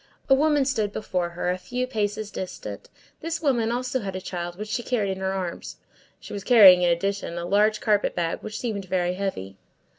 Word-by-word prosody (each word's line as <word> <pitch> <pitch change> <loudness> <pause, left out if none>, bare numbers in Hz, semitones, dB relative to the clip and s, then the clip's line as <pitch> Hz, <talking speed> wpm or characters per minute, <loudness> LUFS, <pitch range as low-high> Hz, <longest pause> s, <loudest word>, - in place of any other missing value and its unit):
A - - +7
woman 290 0 +3
stood 220 -7 0
before 180 -5 -2
her, 175 +1 -2
a 180 - -3
few 245 +8 -3
paces 215 -3 -2
distant. 185 - -7 0.3
This 330 0 -3
woman 240 -7 +1
also 250 +2 -1
had 195 -4 -5
a - - -2
child, 175 -1 -5
which 210 +1 -6
she 225 - -1
carried 220 -5 -1
in 190 - -4
her 190 0 -1
arms. 185 -3 -5 0.4
She - - -10
was 200 -1 -5
carrying, 200 -7 +8
in 175 - +3
addition, 175 0 -1
a 170 - -3
large 210 +3 +3
carpet 210 -2 +1
bag, 170 -1 -1
which 215 0 -6
seemed 215 -5 -3
very 180 -1 0
heavy. 180 - -4
200 Hz, 205 wpm, -25 LUFS, 180-230 Hz, 0.4 s, carrying